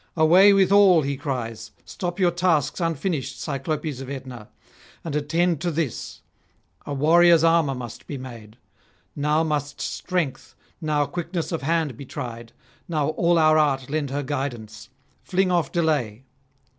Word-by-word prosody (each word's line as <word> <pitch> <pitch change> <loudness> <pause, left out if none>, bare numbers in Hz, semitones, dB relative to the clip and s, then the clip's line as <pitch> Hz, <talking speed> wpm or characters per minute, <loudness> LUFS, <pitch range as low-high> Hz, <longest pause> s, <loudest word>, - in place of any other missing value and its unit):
'Away 175 +6 +6
with 195 -1 +3
all!' 195 -5 +6
he 140 +1 -2
cries: 115 -6 -5 0.2
'stop 175 0 -5
your 180 -2 +3
tasks 165 -4 +1
unfinished, 165 -2 -2
Cyclopes 145 -1 -3
of 135 - -8
Aetna, 130 -5 -8 0.5
and 160 -3 -4
attend 165 +2 0
to 175 - 0
this; 160 -6 -4 0.7
a - - -5
warrior's 165 +3 +5
armour 165 -4 +3
must 120 -3 -9
be 140 - -5
made. 115 -4 -10 0.6
Now 150 +2 +1
must 145 -2 -3
strength, 175 -7 -3 0.3
now 150 -2 +1
quickness 170 +2 -4
of 165 - -2
hand 155 -4 -1
be 140 - -9
tried, 120 -6 -7 0.4
now 155 -4 0
all 170 +2 +2
our 155 -1 +5
art 135 -3 0
lend 150 -2 -1
her 145 +2 -3
guidance. 120 -6 -5 0.3
Fling 185 0 0
off 175 -2 +1
delay.' 145 -9 -1
150 Hz, 145 wpm, -23 LUFS, 135-170 Hz, 0.7 s, Away